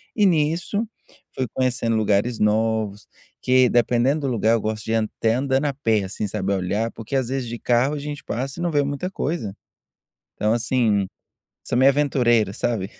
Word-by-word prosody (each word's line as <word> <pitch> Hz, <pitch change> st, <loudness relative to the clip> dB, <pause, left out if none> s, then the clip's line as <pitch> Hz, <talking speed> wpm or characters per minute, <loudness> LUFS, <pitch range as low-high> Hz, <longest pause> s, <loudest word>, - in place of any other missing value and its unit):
E 210 Hz, -, +3 dB
nisso, 170 Hz, +5 st, +1 dB, 0.5 s
fui 130 Hz, -2 st, -2 dB
conhecendo 125 Hz, -3 st, 0 dB
lugares 110 Hz, +2 st, +1 dB
novos 105 Hz, -1 st, 0 dB, 0.3 s
que, 130 Hz, -1 st, +4 dB
dependendo 120 Hz, +4 st, +2 dB
do 140 Hz, -, -1 dB
lugar, 110 Hz, -1 st, +2 dB
eu 115 Hz, -, +2 dB
gosto 110 Hz, 0 st, -3 dB
de 110 Hz, -, -3 dB
ir -, -, +2 dB
até 110 Hz, 0 st, 0 dB
andando 135 Hz, +1 st, +1 dB
a 140 Hz, -, 0 dB
pé 110 Hz, -6 st, +1 dB
assim, 100 Hz, +2 st, -4 dB
sabe, 100 Hz, -1 st, -2 dB
olhar, 100 Hz, +4 st, -1 dB
porque 115 Hz, +4 st, -6 dB
às 130 Hz, -2 st, 0 dB
vezes 130 Hz, -2 st, -2 dB
de 120 Hz, -, -5 dB
carro 125 Hz, +5 st, +1 dB
a 145 Hz, -, -4 dB
gente 145 Hz, 0 st, -6 dB
passa 135 Hz, +7 st, -4 dB
e -, -, -2 dB
não 175 Hz, -, 0 dB
vê 145 Hz, -2 st, +2 dB
muita 140 Hz, +6 st, -3 dB
coisa. 145 Hz, -, -3 dB, 0.8 s
Então 105 Hz, +1 st, 0 dB
assim, 115 Hz, -4 st, +1 dB, 0.6 s
sou -, -, -1 dB
meio 130 Hz, +2 st, +6 dB
aventureiro, 120 Hz, -7 st, +2 dB
sabe? 100 Hz, -5 st, -2 dB
120 Hz, 185 wpm, -22 LUFS, 110-140 Hz, 0.8 s, meio